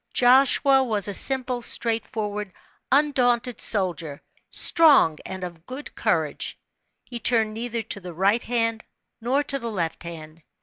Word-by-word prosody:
Joshua 265 +2 +3
was 215 -6 0
a 205 - -4
simple, 255 +1 +2
straightforward, 215 -3 -2 0.4
undaunted 250 -4 +1
soldier 175 -8 -3 0.3
"strong 285 - +5
and 190 -1 -7
of 175 -2 -7
a - - -30
good 255 - -10
courage." - - -3 0.5
He 240 -1 -8
turned 220 -1 +1
neither 230 0 -5
to 205 - -4
the 180 -2 -10
right 200 +6 +1
hand 230 -2 -2 0.4
nor 260 +5 0
to 275 -1 -3
the 235 -2 -5
left 170 -7 -4
hand. 165 -1 -11
230 Hz, 140 wpm, -23 LUFS, 190-255 Hz, 0.5 s, strong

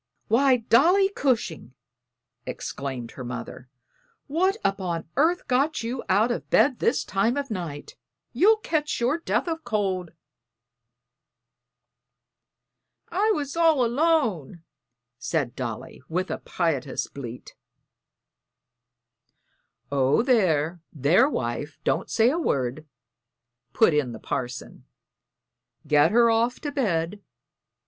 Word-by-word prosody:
"Why, 260 +2 +4
Dolly 335 - +4
Cushing!" 230 - -2 0.7
exclaimed 130 -4 -5
her 130 - -8
mother. 125 +1 -7 0.6
"What 370 +8 +1
upon 180 -5 -1
earth 335 +6 +2
got 275 +3 +1
you 240 +2 -4
out 210 +6 +3
of 235 - -4
bed 275 -4 +3
this 255 - +1
time 215 +7 0
of 280 -3 -3
night? 165 -7 -6 0.4
You'll 405 - +5
catch 310 -7 -2
your 250 +7 +1
death 335 - -1
o' 325 -1 -1
cold." 200 - -2 3.0
"I 400 +5 +1
was 285 -2 -4
all 325 -6 +4
alone," 235 - 0 0.6
said 125 0 -2
Dolly, 120 -2 -6
with 185 +3 -2
a - - -3
piteous 145 -7 -2
bleat. 125 -3 -9 2.4
"Oh, 140 - +2
there, 175 - +2
there, 165 - +3
wife; 145 - -4
don't - - 0
say 230 +2 +3
a 330 - -1
word," 140 - -2 0.8
put 220 -8 +4
in 140 -5 0
the 110 - -8
parson. 125 +2 -5 1.0
"Get 150 +1 +4
her 235 +2 +4
off 230 +2 +1
to 290 - -3
bed. 200 - -1
215 Hz, 110 wpm, -25 LUFS, -, 3.0 s, You'll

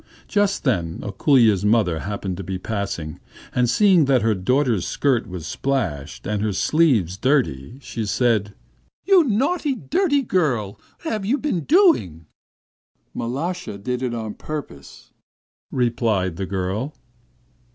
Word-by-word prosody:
Just 205 -1 +1
then 85 - 0
Ako√∫lya's 110 -1 +3
mother 105 -6 +2
happened 100 -1 -4
to 95 - -5
be 95 +1 -4
passing, 90 -6 -4 0.3
and 125 -1 +2
seeing 185 - +5
that 130 -5 +3
her 110 -1 +3
daughter's 115 0 +1
skirt 125 -5 +1
was 90 -4 -7
splashed, 90 - -3
and 105 0 -1
her 105 -1 0
sleeves 110 - +2
dirty, 125 - 0
she 115 -4 -5
said: 105 -3 +1 0.5
'You 385 -3 +6
naughty, 280 - 0
dirty 295 - +1
girl, 130 - 0 0.2
what 325 - -3
have 215 -2 -2
you 235 +9 +1
been 240 - -2
doing?' 290 - +3 0.9
'Mal√°sha 165 - -3
did 125 +1 -2
it 125 -2 -2
on 110 -2 -4
purpose,' 140 - -8 0.6
replied 115 -8 0
the 95 -1 -3
girl. 100 +9 -3
120 Hz, 130 wpm, -22 LUFS, 95-155 Hz, 0.9 s, You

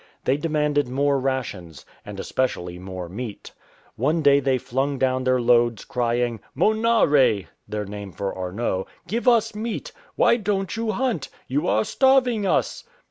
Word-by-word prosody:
They 130 - +2
demanded 150 -2 0
more 140 +2 +1
rations, 120 - -4 0.2
and - - -8
especially 90 -9 -2
more 90 -1 -6
meat. 105 +4 -7 0.5
One 150 +7 +1
day 140 -1 +6
they 135 -1 +1
flung 135 +3 -2
down 130 0 +1
their 130 0 +3
loads 120 -2 +2
crying, 120 -1 -1 0.2
"Monare" 180 - +3 0.2
(their 105 -1 -3
name 100 -1 -7
for 100 +2 -4
Arnot), 95 +1 -2
" - - -35
give 235 +4 -2
us 225 -2 +4
meat. 230 - -4 0.2
Why 235 - +4
don't 195 -3 -2
you 225 0 -2
hunt? 240 - -1 0.2
You 140 +3 -1
are 110 +1 +2
starving 250 -6 +3
us."" - - 0
130 Hz, 150 wpm, -23 LUFS, -, 0.5 s, day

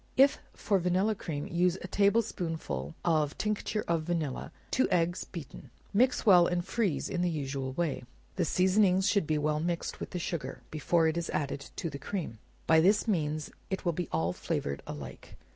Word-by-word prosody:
If 270 +1 +6 0.2
for 200 -2 +1
vanilla 185 +5 +2
cream; 155 -7 -4
use 180 +1 +1
a - - -4
table 200 +4 +3
spoonful 155 - -4
of 155 -4 +2
tincture 215 0 -1
of 170 -1 +1
vanilla, 155 -5 -2 0.2
two 260 - +2
eggs 175 0 +1
beaten; 165 -4 -9 0.2
mix 250 +5 +3
well 180 -5 +7
and 175 -1 -1
freeze 205 -11 0
in 175 - -2
the 180 - +2
usual 135 -4 -3
way. 165 -2 -1 0.3
The 185 - +1
seasoning 185 +2 +3
should 200 -4 +2
be 155 - +1
well 150 0 +1
mixed 170 +1 -2
with - - -5
the 180 - -4
sugar, 170 -2 -4
before 160 +2 +2
it 160 +1 0
is 170 - -2
added 140 -1 -3
to - - -3
the 140 -3 -6
cream; 145 - -4 0.3
by 160 0 +6
this 205 +6 +3
means, 155 -6 -1 0.2
it 190 0 -3
will 170 - +2
be 175 0 -3
all 85 +2 0
flavored 70 -5 -3
alike. 70 -4 -8
170 Hz, 185 wpm, -30 LUFS, 150-190 Hz, 0.3 s, well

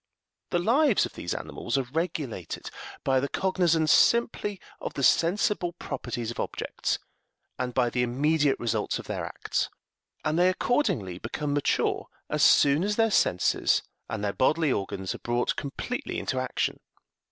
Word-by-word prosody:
The 175 - +1
lives 235 - +3
of - - -8
these 85 - -4
animals 120 - -3
are 135 - +1
regulated 155 - -3 0.3
by 135 -1 +3
the 140 +2 -2
cognizance 170 -5 +2
simply 210 -1 +3 0.2
of - - -5
the 140 - -2
sensible 175 +3 +2
properties 120 -7 -4
of - - -8
objects, - - -2 0.6
and 125 -1 -1
by 120 -2 +2
the 125 - 0
immediate 145 +4 +2
results 110 -3 -1
of - - -8
their - - -3
acts, - - -2 0.6
and 155 +2 +1
they 180 +1 +5
accordingly 150 - 0
become 145 +6 -3
mature 145 -1 +1 0.2
as - - 0
soon 145 +4 +5
as 205 +1 0
their 225 0 +3
senses 90 - +2 0.3
and 110 -2 -3
their 100 -1 0
bodily 150 - +2
organs 95 -3 -2
are - - -8
brought 120 +1 0
completely 145 - -4
into 130 - -2
action. 130 -1 -1
145 Hz, 150 wpm, -27 LUFS, 120-180 Hz, 0.6 s, they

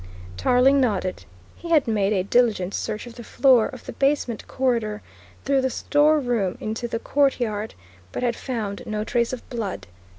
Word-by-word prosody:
Tarling 255 - +4
nodded. 195 -7 -1 0.3
He 340 - -9
had 315 -6 +4
made 210 -3 +1
a 190 -3 +1
diligent 205 -3 +2
search 210 +2 -3
of 240 - -10
the 235 - -8
floor 255 -2 +4
of 255 -4 -11
the - - -7
basement 275 -5 0
corridor 230 -5 -1 0.4
through 275 -1 +2
the 260 - 0
store 300 +4 +3
room 235 -8 -1
into 220 +3 -3
the 230 - -2
courtyard, 235 -5 0 0.4
but - - -4
had 235 -1 +1
found 220 -6 -4
no 215 0 -2
trace 235 +1 0
of 255 - -7
blood. 225 -6 -4
235 Hz, 170 wpm, -23 LUFS, 215-260 Hz, 0.4 s, Tarling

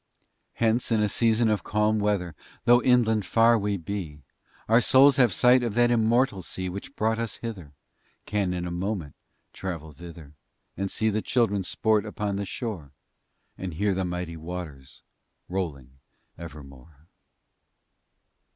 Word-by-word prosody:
Hence, 115 +2 0
in 110 - +3
a 105 - +2
season 115 +2 +2
of 105 -2 0
calm 105 0 +1
weather, 100 -5 -1 0.3
Though 120 +1 +6
inland 115 -4 +3
far 115 +4 +4
we 100 0 -1
be, 80 -5 -6 0.4
Our 115 +2 +5
Souls 135 +4 +5
have 125 -5 +5
sight 125 +6 +4
of 115 -4 -3
that 120 0 +4
immortal 115 -2 +2
sea 95 +1 -4
Which 100 +9 -8
brought 110 +1 0
us 115 -2 -3
hither, 95 -11 -7 0.5
Can 100 -3 -1
in 90 -1 -3
a 90 - -4
moment 90 -4 -3 0.4
travel 80 -5 -6
thither, 85 -3 -12 0.4
And 100 +1 -3
see 110 +2 0
the 110 +1 -1
Children 105 -6 +1
sport 110 +3 +1
upon 105 -1 -3
the 100 - -3
shore, 90 - -6 0.7
And 90 -4 -5
hear 100 +3 +1
the 95 0 -1
mighty 90 -2 -4
waters 80 -5 -8 0.4
rolling 70 -9 -5 0.4
evermore. 75 -2 -12
100 Hz, 145 wpm, -26 LUFS, 85-115 Hz, 0.7 s, Though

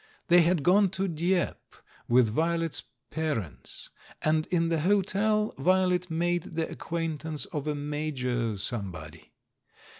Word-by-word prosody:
They 175 0 +7
had 170 -2 +2
gone 195 +4 +5
to 195 +1 0
Dieppe 175 +1 -1 0.3
with 120 -2 +4
Vio 165 +5 +1
let's 165 -2 0 0.3
parents, 150 - -4 0.3
and 155 0 +2
in 165 -2 +1
the 165 -1 +1
hotel 205 +4 +2
Violet 180 +2 +2
made 175 +2 0
the 160 -1 0
acquaintance 160 -2 -3
of 150 -1 -5
a 150 - 0
Major 130 -6 -2
somebody. 85 -8 -3
160 Hz, 125 wpm, -28 LUFS, 145-175 Hz, 0.3 s, They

